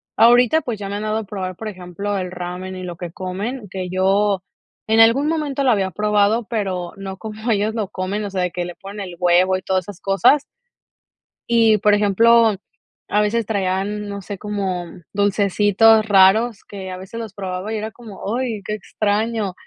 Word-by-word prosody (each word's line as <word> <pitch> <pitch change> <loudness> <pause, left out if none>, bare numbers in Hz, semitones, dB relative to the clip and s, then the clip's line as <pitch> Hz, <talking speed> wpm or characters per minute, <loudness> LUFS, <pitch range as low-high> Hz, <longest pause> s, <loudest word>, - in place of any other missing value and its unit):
Ahorita, 245 +6 +5
pues, 235 -6 -4
ya 200 - -5
me 200 - -4
han 210 - -4
dado 215 0 -1
a 220 - -2
probar, 185 -2 -5
por 220 - -6
ejemplo, 200 +1 -4
el 180 -1 -4
ramen 180 +1 -6
y 185 - -7
lo 175 -1 -6
que 175 -1 -7
comen, 205 +7 -5
que 185 -1 -5
yo 195 +2 +2 0.5
en 220 +1 +5
algún 235 +6 +5
momento 300 -3 -1
lo 255 - +5
había 195 -3 +1
probado, 210 +3 +2
pero 185 -6 -2
no 195 -1 -7
como 220 +2 -4
ellos 215 +1 +1
lo 210 -4 -2
comen, 200 +2 -3
o 205 - -4
sea, 190 -1 -2
de 180 - -1
que 180 - -3
le 175 0 -7
ponen 200 +1 -8
el 175 - -9
huevo 180 +1 +3
y - - -8
todas 185 -1 0
esas 205 -2 -10
cosas. 235 +9 +3 1.1
Y 225 -2 +5
por 210 0 +3
ejemplo, 220 +2 +4 0.5
a 210 - +2
veces 220 +1 0
traían, 205 +1 -2
no 200 0 -5
sé, 200 +1 -7
como 195 -3 -3 0.3
dulcecitos 205 +2 +4
raros 205 +3 +4
que 190 -2 -7
a 185 - -6
veces 190 +5 -8
los 215 -3 -8
probaba 190 +1 -4
y - - -1
era 215 +1 -4
como, 220 -1 -6
ay, 235 -5 -2
qué 210 - -3
extraño. 215 0 -1
205 Hz, 195 wpm, -20 LUFS, 190-220 Hz, 1.1 s, Ahorita